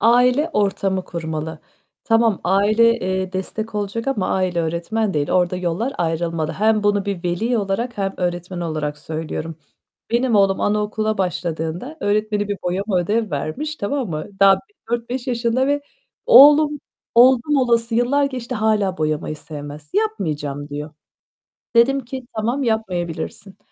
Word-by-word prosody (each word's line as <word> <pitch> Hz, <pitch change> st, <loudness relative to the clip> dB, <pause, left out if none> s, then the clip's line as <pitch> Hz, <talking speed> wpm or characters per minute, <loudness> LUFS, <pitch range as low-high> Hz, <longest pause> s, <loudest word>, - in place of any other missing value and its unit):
Aile 250 Hz, +6 st, +4 dB
ortamı 195 Hz, -4 st, 0 dB
kurmalı. 160 Hz, -1 st, -5 dB, 0.5 s
Tamam, 225 Hz, -3 st, +3 dB
aile, 215 Hz, +5 st, +4 dB
eee, 185 Hz, -2 st, -2 dB
destek 215 Hz, +4 st, -4 dB
olacak 210 Hz, +4 st, -2 dB
ama 215 Hz, -9 st, -1 dB
aile 185 Hz, -2 st, 0 dB
öğretmen 175 Hz, +6 st, -1 dB
değil. 145 Hz, -1 st, 0 dB
Orada 180 Hz, 0 st, +2 dB
yollar 185 Hz, +9 st, -2 dB
ayrılmalı. 165 Hz, -1 st, -1 dB
Hem 215 Hz, +1 st, +2 dB
bunu 205 Hz, -1 st, +2 dB
bir 195 Hz, -3 st, -4 dB
veli 220 Hz, +8 st, 0 dB
olarak 210 Hz, +4 st, -2 dB
hem 195 Hz, -1 st, -1 dB
öğretmen 175 Hz, 0 st, -3 dB
olarak 155 Hz, -3 st, -3 dB
söylüyorum. 160 Hz, 0 st, -5 dB, 0.5 s
Benim 235 Hz, 0 st, +2 dB
oğlum 195 Hz, -1 st, +3 dB
anaokuluna 210 Hz, +1 st, 0 dB
başladığında 175 Hz, -, -3 dB
öğretmeni 210 Hz, 0 st, 0 dB
bir 205 Hz, -, -1 dB
boyama 190 Hz, +2 st, 0 dB
ödev 210 Hz, +4 st, 0 dB
vermiş, 170 Hz, -, -3 dB
tamam 245 Hz, -, -2 dB
mı? 155 Hz, -1 st, -4 dB
Daha 195 Hz, 0 st, +8 dB
bir 415 Hz, -, -16 dB, 0.2 s
4-5 240 Hz, +2 st, -2 dB
yaşında 240 Hz, +1 st, +1 dB
ve 285 Hz, +1 st, +1 dB, 0.5 s
oğlum, 295 Hz, -, +7 dB, 0.3 s
oldum 255 Hz, +4 st, +5 dB
olası 235 Hz, -3 st, +2 dB
yıllar 250 Hz, +5 st, +2 dB
geçti 255 Hz, -3 st, -4 dB
hâlâ 215 Hz, -4 st, +1 dB
boyamayı 155 Hz, 0 st, -1 dB
sevmez. 150 Hz, -1 st, -9 dB
"Yapmayacağım." 155 Hz, -10 st, -2 dB
diyor. 150 Hz, +1 st, -6 dB, 0.9 s
Dedim 260 Hz, +4 st, +5 dB
ki, 260 Hz, +1 st, -7 dB
"Tamam 235 Hz, +6 st, -1 dB
yapmayabilirsin." 195 Hz, -3 st, -3 dB
205 Hz, 135 wpm, -21 LUFS, 175-235 Hz, 0.9 s, Daha